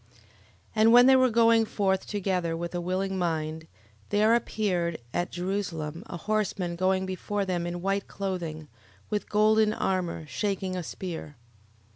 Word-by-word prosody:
11:8. 120 +1 -29 0.6
And 220 +1 +6
when 245 +1 +8
they 265 0 +7
were 255 -1 +5
going 230 0 +5
forth 195 -3 0
together 180 -5 -1
with 170 +1 -5
a 175 - -2
willing 190 +2 -1
mind, 160 -2 -2 0.4
there 215 +2 +4
appeared 185 -8 0 0.2
at 175 - -1
Jerusalem 175 -4 -3
a - - -6
horseman 200 -3 -1
going 185 +1 +1
before 195 +2 -2
them 175 -2 -1
in 175 0 -5
white 195 +1 0
clothing, 170 -6 -4 0.4
with 210 -1 -2
golden 215 0 +4
armour, 180 -5 -1
shaking 190 +2 -2
a 180 - -2
spear. 165 -3 -6
185 Hz, 150 wpm, -27 LUFS, 170-210 Hz, 0.6 s, when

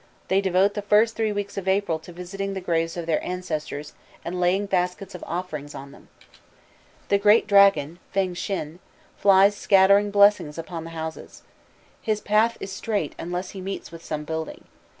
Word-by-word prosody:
They 195 +1 +3
devote 190 +1 +2
the 205 - -3
first 215 +3 +3
three 220 -1 0
weeks 205 -1 -3
in 190 0 -3
April 190 -4 +1
to 170 - -13
visiting 195 +3 -5
the - - -2
graves 165 -2 -1
of 170 - -4
their 165 -2 0
ancestors, 155 -5 -5 0.3
and 180 +1 -4
laying 180 +3 +2
baskets 185 0 -2
of 180 - -8
offerings 160 -5 -5
on 140 0 -9
them. - - -17 1.0
The 200 - +3
great 210 +2 +5
dragon, 200 -6 +4
Feng 190 -2 0
Shin, 175 -3 -4 0.4
flies 200 +1 +5
scattering 200 +1 +4
blessings 200 -7 +4
upon 165 0 -6
the - - -7
houses. 160 0 -7 0.6
His 215 -1 -1
path 215 +3 +2
is 195 - -6
straight, 200 -5 -2
unless 180 +2 -4
he 195 - -8
meets 195 +1 -6
with 165 0 -11
some 150 -1 -4
building. 160 +1 -5
190 Hz, 170 wpm, -24 LUFS, 165-200 Hz, 1.0 s, great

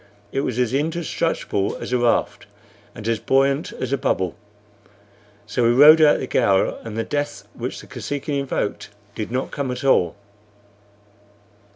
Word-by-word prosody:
It - - -1
was 125 -4 -3
an 125 0 +1
indestructible 155 -10 -1
as - - -5
a 125 - +2
raft 120 -1 0 0.5
and 110 - -7
as 115 -1 0
buoyant 135 +4 +1
as - - -4
a 140 - 0
bubble; 95 -5 -1 1.1
so 105 +4 -2
we 115 - +4
rode 150 +6 +8
out 150 -1 +6
the - - -4
gale, 100 -7 +1
and 115 -1 -7
the 115 - 0
death 145 +2 -4
which - - -5
the - - -13
Kosekin 145 +1 -5
invoked 135 -6 -3 0.2
did 110 +1 -5
not 130 +2 -2
come 140 -2 -3
at 125 - -4
all. 115 -11 +3
130 Hz, 160 wpm, -22 LUFS, 115-145 Hz, 1.1 s, rode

